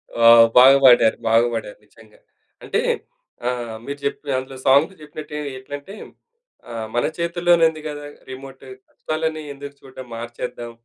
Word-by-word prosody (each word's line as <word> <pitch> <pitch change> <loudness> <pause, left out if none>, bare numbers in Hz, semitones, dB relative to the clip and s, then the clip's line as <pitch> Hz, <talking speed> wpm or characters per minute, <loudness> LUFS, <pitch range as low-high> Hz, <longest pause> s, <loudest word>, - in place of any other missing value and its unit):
ఆ! 115 - +2 0.3
బాగా 135 +2 +8
పాడారు, 120 -3 +6
బాగా 115 +1 +4
పాడారు. 110 -2 -5
నిజంగ. 110 -1 -21 0.5
అంటే - - -1 0.7
ఆ! - - +2 0.4
మీరు 140 0 -6
చెప్పిన, 145 +1 -4
అందులో 130 +1 -9
సాంగ్స్ 145 +8 +4
చెప్పినట్టు 150 0 -8 0.2
ఎట్లంటే 145 +9 -9 0.7
ఆహ్, 115 -2 -5
మన 120 - +1
చేతుల్లోనే 170 0 +2
ఉంది 155 -1 -9
కదా 145 0 -7 0.2
రిమోట్. 135 +1 -10 0.3
కష్టాలన్నీ 155 0 -3
ఎందుకు 140 0 -10
చూడడం 130 -1 -11
మార్చేద్దాం 120 +1 -7
135 Hz, 135 wpm, -21 LUFS, 120-155 Hz, 0.7 s, బాగా